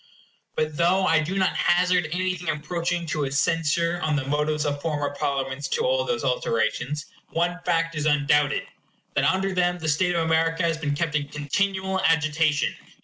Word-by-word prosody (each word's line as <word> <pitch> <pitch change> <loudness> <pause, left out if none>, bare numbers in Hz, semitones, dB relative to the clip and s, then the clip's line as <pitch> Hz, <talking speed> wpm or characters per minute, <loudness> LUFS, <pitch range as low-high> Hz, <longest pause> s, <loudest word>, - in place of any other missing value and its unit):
But 155 -1 -1
though 185 +3 +3
I 165 -3 +4
do 165 +5 -2
not 190 -1 +1
hazard 180 -1 +2
anything 180 -1 -2
approaching 170 +3 -2
to 150 -2 -2
a 135 - -4
censure 165 +4 +1
on 155 -1 +1
the 145 -2 -1
motives 150 +2 0
of 145 -1 -2
former 145 -3 -2
Parliaments 140 -1 -2
to 470 - -1
all - - +2
those 480 -1 -2
alterations, 465 - -1 0.2
one 175 +1 -1
fact 165 -1 +1
is 155 -1 -1
undoubted—that 145 -1 0
under 190 +1 +1
them 180 -1 +1
the 160 -2 -5
state 175 +4 +2
of 165 -1 +1
America 165 +1 +1
has 170 - +3
ica - - -1
has 160 - -8
been 145 -2 -1
kept 165 0 -1
in 145 -1 0
continual 190 +6 -1
agitation. 155 -1 +2
165 Hz, 180 wpm, -24 LUFS, 150-180 Hz, 0.2 s, I